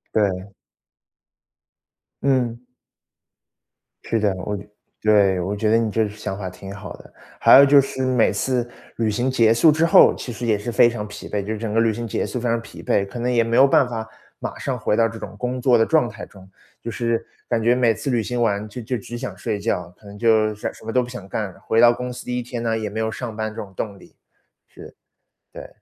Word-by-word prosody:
对。 95 -2 +1 1.8
嗯。 125 -4 +1 1.4
是 115 - -1
的， 105 -2 +1
我 105 +3 -4 0.4
对， 100 -3 +4
我 95 +4 -2
觉 105 +1 0
得 110 - +4
你 115 -2 0
这 110 0 +1
想 105 -2 -6
法 95 -3 -5
挺 95 +2 -10
好 100 - -8
的。 - - -17 0.3
还 - - +8
有 140 - +9
就 140 0 +7
是 130 -1 -4
每 125 -3 +3
次 125 -2 -1 0.3
旅 115 -2 +1
行 120 +5 0
结 115 -4 +4
束 150 +7 +5
之 160 +2 +2
后， 165 - +7
其 125 - -7
实 120 +1 -5
也 110 -2 +2
是 110 +4 -5
非 120 - +5
常 110 -3 -5
疲 105 0 -9
惫， 105 - -1
就 105 +3 -3
是 - - -4
整 110 -2 -3
个 115 - +3
旅 115 -1 +2
行 115 +2 -5
结 - - -2
束 125 - -4
非 120 - -2
常 115 0 +1
疲 - - -12
惫， 100 - +1
可 100 +5 -8
能 125 +1 0
也 120 -2 +3
没 115 0 -1
有 135 - +7
办 135 -1 +4
法 110 -2 -5 0.3
马 - - -5
上 - - -3
回 105 - 0
到 115 - +3
这 115 - -9
种 100 -1 -8
工 125 +2 -3
作 125 -2 +4
的 115 - +3
状 155 -8 +2
态 110 0 -9
中。 95 -1 -17 0.3
就 - - -5
是 115 0 -1 0.2
感 115 -2 +1
觉 120 +2 +3
每 120 -3 +3
次 140 - -5
旅 120 -3 +1
行 125 +1 -2
完 105 -2 0
就 125 +4 -7
就 120 +2 -3
只 120 +3 -8
想 130 +1 -6
睡 110 -3 -3
觉， 90 -5 -2
可 - - -22
能 100 0 -11
就 110 -1 +3
想 105 - -5
什 - - -16
什 - - -16
么 115 - -3
都 125 +2 +2
不 120 - -8
想 120 -6 -9
干 100 0 -3
了， - - -19
回 115 - 0
到 120 0 +8
公 125 +1 -5
司 125 - -9
第 125 0 -2
1 - - -2
天 120 -1 -6
呢， 115 -1 0
也 110 -1 -3
没 110 +2 -5
有 110 0 -1
上 115 -3 -6
班 110 0 -3
这 - - -6
种 95 -2 -11
动 100 -1 -5
力。 - - -19 0.5
是， - - -14 0.6
对。 - - -9
115 Hz, 260 characters per minute, -22 LUFS, 105-120 Hz, 1.8 s, 有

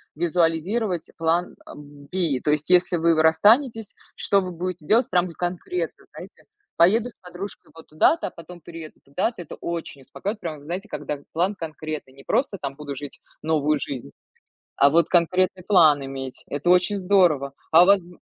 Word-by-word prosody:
визуализировать 175 +3 0
план, 165 +2 0
а, - - -11
B. 145 +1 -4
То 150 - +2
есть, 150 -1 -1
если 180 -1 +4
вы, 165 +1 +3
вы 155 - +3
расстанетесь, 220 - +3 0.2
что 200 -1 +2
вы 185 - -5
будете 175 -2 -5
делать, 230 +3 +3
прям 180 0 +2
вот 170 - -11
конкретно, 180 - -4
знаете, - - -12 0.3
поеду 220 +8 +4
с - - -18
подружкой 180 +2 -9
вот 165 - -14
туда-то, 155 - +2
а - - -7
потом 175 0 -12
перееду 165 -1 -10
туда-то. 180 - -2
Это - - -10
очень 165 -5 -6
успокаивает, 205 - -5
прям 165 -5 -5
вот 145 - -16
знаете, 185 +6 -5
когда 150 -7 -5
план 180 +5 +1
конкретный, 155 -4 -7
не 135 0 -16
просто, 255 -7 0
там, 140 -1 -4
буду 145 -1 -7
жить 145 +1 -9 0.2
новую 155 -1 +1
жизнь, 125 - -6 0.7
а 140 - +5
вот 165 +3 +3
конкретный 180 +1 +1
план 155 -8 +5
иметь. 135 -1 -7
Это 145 +4 -3
очень 180 +3 +3
здорово. 180 -8 +2 0.2
А 170 +2 +8
у - - 0
вас? 200 -1 +5
Да, 175 0 -16
170 Hz, 180 wpm, -23 LUFS, 150-185 Hz, 0.7 s, А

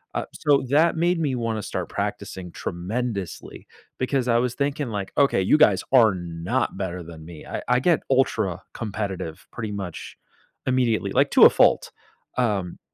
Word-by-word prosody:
Uh, - - -1
so 140 -2 +2
that 155 +5 +4
made 175 +1 +2
me 140 -5 0
wanna 115 -2 -2
start - - -4
practicing 90 -2 -4
tremendously, 100 +2 -5 0.3
because 130 -1 0
I 115 - +4
was 125 0 0
thinking 140 -1 -1
like, 100 -3 -4
"Okay, 140 -9 +3
you 95 - +4
guys - - +4
are 110 -6 +6
not 85 +8 -2
better 90 -2 -4
than 80 -1 -11
me." 80 -2 -11
I - - -5
I 125 0 +3
get 170 0 +3
ultra 135 0 +1
competitive, 100 -5 -5
pretty 110 -2 -5
much, 95 -5 -6 0.5
immediately- 125 -4 +1
like, - - +3
to - - +6
a - - +10
fault, - - +3 0.5
um, 100 -8 -1
115 Hz, 160 wpm, -24 LUFS, 95-130 Hz, 0.5 s, a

